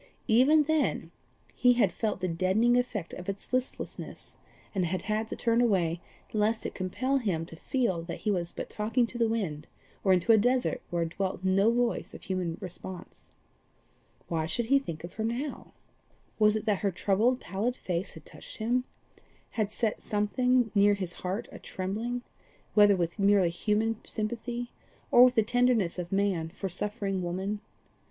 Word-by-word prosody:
Even 270 +7 +5
then 315 0 0 0.4
he 250 -1 +4
had 210 -8 +2
felt 210 -4 -2
the 185 - 0
deadening 190 +8 +2
effect 240 -8 -1
of 180 +1 -6
its 195 +5 -6
listlessness, 255 0 -4 0.4
and 190 -3 +1
had 185 +2 -2
had 215 +1 -1
to - - -4
turn 235 0 +2
away 175 -7 +2 0.3
lest 215 +1 +1
it - - 0
should - - -20
compel 255 +9 -1
him 180 -9 -1
to 165 - -9
feel 230 - -1
that 170 0 -7
he 215 - +1
was 175 -3 -1
but - - -6
talking 225 +4 +1
to 240 +1 -6
the 230 - +4
winds, 185 -10 -2 0.4
or 195 - +4
into 185 +4 +4
a 220 - +7
desert 250 +2 +1
where 170 -1 0
dwelt 185 +2 -3
no 195 +4 +4
voice 240 0 -1
of - - -11
human 180 -3 -2
response. 185 0 -9 1.0
Why 160 -2 -1
should 230 +9 -1
he 275 - +7
think 165 - -7
of 170 +1 -8
her 220 - -3
now? 245 +6 -3 0.7
Was 210 0 +5
it 215 - -2
that 210 -3 +1
her 200 - +1
troubled 210 +7 +1
pallid 220 +6 -2
face 180 -3 -3
had 160 - -12
touched - - -9
him 245 +3 0 0.7
had 215 -2 -1
set 220 0 -1
something 240 +3 +1
near 205 0 +5
his 185 -3 -4
heart 185 +4 -3
a - - -9
trembling, 225 +6 -3 0.5
whether 205 -1 +6
with 170 0 -2
merely 195 -3 +4
human 215 +4 0
sympathy 240 +2 -4 0.4
or 240 - +9
with 250 0 +3
the 220 - +4
tenderness 235 -6 +2
of 175 -1 -5
man 195 -5 +1
for 195 +2 -5
suffering 195 +1 -1
woman? 190 +4 -3
210 Hz, 175 wpm, -29 LUFS, 185-235 Hz, 1.0 s, or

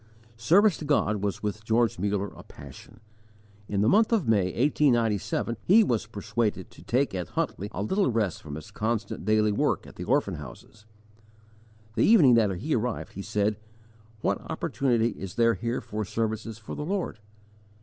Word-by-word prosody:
Service 180 - +4
to - - -8
God 125 -8 +2
was 100 0 -3
with 105 +1 -3
George 115 -2 +1
Muller 100 0 -1
a - - -11
passion. 70 - -13 0.7
In 100 -1 0
the 105 - +3
month 220 - +4
of 215 - +1
May, 105 -4 +3
1897, 115 -2 +1
he 220 +5 +6
was 115 - -1
persuaded 110 0 -2
to - - -15
take 130 +1 0
at 90 -2 -3
Huntly 100 +2 -3
a 100 - -3
little 190 - +1
rest 110 -6 -1
from 75 -2 -7
his 80 0 -9
constant 110 -3 -3
daily 110 0 +3
work 100 - 0
at - - -14
the - - -5
orphan - - 0
houses. 75 - -12 1.1
The - - +1
evening 170 - +6
that 115 -3 +4
he 145 - -2
arrived 120 -1 -3
he 100 - -6
said, 105 +1 0 0.6
What - - 0
opportunity 120 -4 0
is 95 -5 -8
there 115 -1 +4
here 115 +5 -3
for 105 +1 -4
services 110 +1 -3
for 110 - -9
the - - -5
Lord? 180 - -3
110 Hz, 170 wpm, -27 LUFS, 105-125 Hz, 1.1 s, he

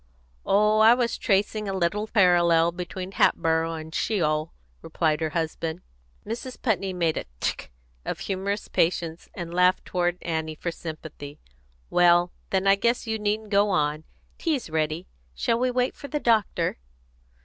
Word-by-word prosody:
"Oh, 210 +2 +4
I 225 +2 +7
was 245 -2 0
just - - -6
tracing 205 +1 +1
a - - -2
little 190 +4 0
parallel 175 -5 +4
between 180 +2 -6
Hatboro' 165 -3 +2
and 160 0 -8
Sheol," 155 -7 0 0.3
replied 155 -1 0
her 160 - 0
husband. 160 +1 -3 0.4
Mrs. 240 +4 -6
Putney 195 -5 0
made 170 -3 0
a - - -3
tchk - - -2 0.4
of - - -4
humorous 200 +2 -3
patience, 165 -1 -1
and 170 -1 -6
laughed 180 +1 +3
toward 175 -1 0
Annie 160 -1 -2
for 170 +3 -3
sympathy. 155 -3 -8 0.5
"Well, 175 0 +4 0.2
then, 190 0 0
I 195 0 +5
guess 235 +4 +1
you 220 -1 -2
needn't 210 +1 -2
go 205 +1 +4
on. 155 -4 0 0.4
Tea's 285 - -1
ready. 155 +2 -1 0.3
Shall 230 - 0
we 255 +1 +2
wait 250 0 0
for 285 - -9
the 295 +1 -2
doctor?" 225 - +1
180 Hz, 155 wpm, -25 LUFS, 165-210 Hz, 0.5 s, I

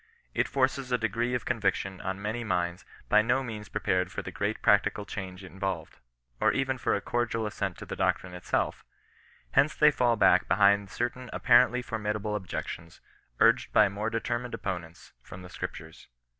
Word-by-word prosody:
It - - +1
forces 130 -1 0
a 125 - +3
degree 120 +2 -1
of 120 - -3
conviction 100 -5 -1
on 95 +1 -3
many 110 +4 -3
minds 90 -3 -2 0.2
by 105 - +5
no 120 +4 +1
means 110 -4 -7
prepared 95 -3 0
for - - -5
the - - -6
great - - -2
practical 105 - +3
change 95 -2 -7
involved, 95 +1 -5 0.4
or - - +4
even 135 -1 -1
for - - +1
a 100 - -2
cordial 115 -1 -1
assent 100 -3 -3
to - - -8
the - - -5
doctrine 90 -1 0
itself. 90 0 -2 0.7
Hence 140 +3 +3
they 150 -1 +6
fall 120 -4 +2
back 95 -3 +4
be 85 - +4
hind 100 0 +4
certain 120 +2 -3
apparently 125 0 +4
formidable 105 -2 -2
objections, 90 -4 -6 0.4
urged - - +4
by 105 -2 +6
more 105 +3 -3
determined 120 +2 -2
opponents, 85 -4 -6
from 90 0 -11
the 90 - -10
Scriptures. 80 -2 -8
105 Hz, 170 wpm, -28 LUFS, 95-120 Hz, 0.7 s, they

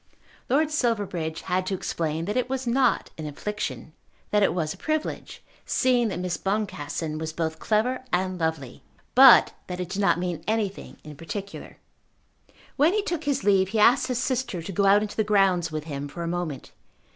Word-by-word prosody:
Lord 300 +4 +2
Silverbridge 205 - -1
had 185 0 -1
to 195 - -1
explain 165 -2 -3
that 210 +4 -3
it 255 0 0
was 265 0 -2
not 250 +1 +1
an 155 - -4
infliction; 185 0 -5 0.4
that 210 - +3
it 195 - +4
was 160 -3 -2
a - - -15
privilege, 310 0 -3 0.2
seeing 250 -2 +2
that 200 - -3
Miss 180 -1 -2
Boncassen 165 -6 -3
was 160 0 -4
both 160 -1 -3
clever 245 +4 0
and 185 0 -1
lovely; 160 -6 -3 0.3
but 260 0 +8 0.2
that 180 0 -5
it 180 -1 -4
did 200 +2 -2
not 195 - +3
mean 175 -3 -3
anything 215 -3 -2
in 150 -1 -10
particular. 195 +6 -7 1.0
When 310 +6 +4
he 425 -1 +1
took 345 -6 -3
his 280 -1 0
leave 190 -2 +3
he 215 +2 -1
asked 250 +4 +5
his 250 -2 -1
sister 250 -8 -2
to 195 - -6
go 195 +2 +2
out 205 +2 +5
into 210 - -6
the 220 - +1
grounds 195 -5 +2
with 155 -1 -4
him 145 -2 -5
for 170 +4 -7
a - - -3
moment. 170 -5 -4
195 Hz, 190 wpm, -25 LUFS, 165-240 Hz, 1.0 s, but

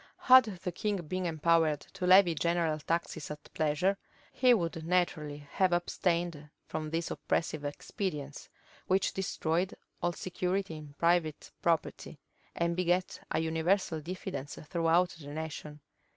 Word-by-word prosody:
Had 255 -1 +8
the 185 -3 -5
king 205 +4 -1
been 185 +3 -2
empowered 160 -2 +2
to 180 - -5
levy 185 -2 +7
general 165 -1 0
taxes 165 -1 -2
at 150 -1 -9
pleasure, 160 +6 +1 0.3
he 255 -1 +4
would 170 -7 +1
naturally 155 -4 -1
have 185 -1 +2
abstained 175 -3 -1 0.2
from 155 -1 -4
these 165 +1 -2
oppressive 155 -2 -1
expedients, 145 0 -4 0.4
which 190 +1 +2
destroyed 180 -1 -1 0.3
all 175 0 +1
security 185 0 -2
in 150 -2 -10
private 170 -3 +1
property, 165 -2 -1 0.4
and 170 0 0
begat 180 +1 0
a - - 0
universal 160 +1 +1
diffidence 175 -4 -5
throughout 170 +1 +3
the 145 - -10
nation. 150 0 -6
170 Hz, 130 wpm, -31 LUFS, 155-180 Hz, 0.4 s, Had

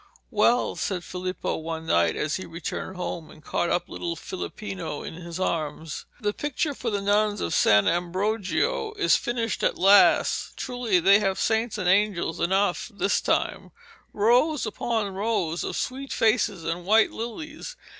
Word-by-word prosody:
'Well,' 235 +2 +2
said 180 -3 -2
Filippo 185 +1 -3
one 160 0 -5
night 85 - +2
as 150 -1 -1
he 185 - -7
returned 170 +3 -5
home 175 -3 -5
and 155 - -16
caught 170 - -1
up 175 - 0
little 170 -1 -4
Filippino 180 -2 -6
in - - -7
his 170 +1 -7
arms, 155 -3 -3
'the 205 -1 0
picture 295 +3 -2
for 250 -3 -3
the 205 -2 -1
nuns 205 +1 +2
of 85 - -2
San 105 -1 +4
Ambrogio 200 - 0
is 415 - +3
finished 230 -3 -2
at - - +1
last! 195 +2 +4
Truly 245 -7 0
they 195 +4 +6
have 195 -2 0
saints 220 0 0
and 185 -4 -2
angels 195 -3 +2
enough 190 +4 +1
this 200 -1 0
time - - -1 0.4
rows 245 +8 +3
upon 215 -2 -2
rows 190 -5 -1
of - - -4
sweet 270 +1 -4
faces 215 -5 +1
and 165 +2 -3
white 220 +4 +4
lilies. 310 - -6
200 Hz, 155 wpm, -25 LUFS, 170-225 Hz, 0.4 s, they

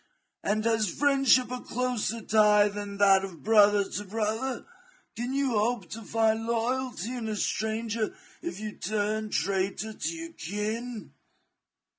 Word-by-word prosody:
And 215 +1 0
has 220 -3 +2
friendship 270 +2 +3
a 250 - -3
closer 240 -2 -2
tie 210 -1 +5
than 205 0 -6
that 195 -1 +5
of 180 -5 -8
brother 205 -2 +5
to 205 - -4
brother; 220 +5 -2 0.5
can 240 +2 -3
you 275 -2 +1
hope 215 -4 0
to 225 - -6
find 225 +1 +1
loyalty 240 -1 -1
in 240 -3 -4
a 215 - -2
stranger 220 +1 -1 0.3
if 175 +3 -5
you 215 0 -4
turn 215 +2 -2
traitor 195 +2 -1
to - - -3
your 330 0 -7
kin? 215 - -4
220 Hz, 140 wpm, -28 LUFS, 205-235 Hz, 0.5 s, tie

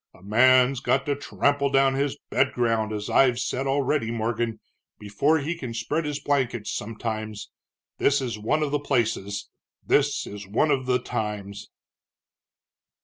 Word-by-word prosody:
A - - -19
man's 130 +5 +4
got 135 0 +1
to 145 - 0
trample 140 0 0
down 135 0 +3
his 140 +1 -1
bed - - +2
ground, 115 -3 0
as 105 -1 -4
I've 125 -3 +4
said 135 +2 -2
already, 140 -2 +1
Morgan, 115 0 -2 0.4
before 105 +10 +1
he 160 +3 -2
can 125 -8 -6
spread 155 +7 -1
his 150 -1 -3
blankets 125 -6 -1
sometimes. 110 -1 -5 0.5
This 145 0 +3
is 125 -4 -3
one 150 +9 0
of 145 - -2
the 145 - +1
places, 115 -7 -1 0.3
this - - +2
is 100 -1 -8
one 115 +10 +2
of 130 -2 0
the 125 -1 +3
times." 105 -4 -5
125 Hz, 150 wpm, -25 LUFS, 110-140 Hz, 0.5 s, man's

